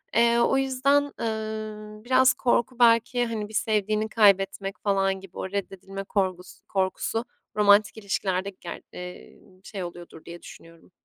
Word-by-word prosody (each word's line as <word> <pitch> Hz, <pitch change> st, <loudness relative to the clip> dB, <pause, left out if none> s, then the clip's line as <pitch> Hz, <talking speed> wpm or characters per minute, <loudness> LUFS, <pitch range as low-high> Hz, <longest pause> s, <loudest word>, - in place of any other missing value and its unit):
Eee, 235 Hz, +1 st, +4 dB
o 235 Hz, +3 st, +3 dB
yüzden, 275 Hz, +2 st, +2 dB
ııı, 215 Hz, -1 st, -5 dB
biraz 260 Hz, +1 st, +5 dB
korku 245 Hz, 0 st, 0 dB
belki, 235 Hz, +1 st, +4 dB
hani, 220 Hz, -3 st, -4 dB
bir -, -, -13 dB
sevdiğini 215 Hz, 0 st, 0 dB
kaybetmek 195 Hz, -2 st, +2 dB
falan 195 Hz, -1 st, +1 dB
gibi 190 Hz, -1 st, -14 dB
o 190 Hz, -, -4 dB
reddedilme 195 Hz, 0 st, -5 dB
korkus 185 Hz, -2 st, -2 dB
korkusu 195 Hz, +4 st, -1 dB, 0.3 s
romantik 205 Hz, 0 st, +4 dB
ilişkilerde 195 Hz, -2 st, -2 dB
ger 170 Hz, -, -7 dB
ııı, 180 Hz, +1 st, -11 dB
şey 195 Hz, -1 st, -6 dB
oluyordur 175 Hz, -2 st, -10 dB
diye 170 Hz, 0 st, -10 dB
düşünüyorum. 165 Hz, +1 st, -15 dB
210 Hz, 135 wpm, -26 LUFS, 195-230 Hz, 0.3 s, biraz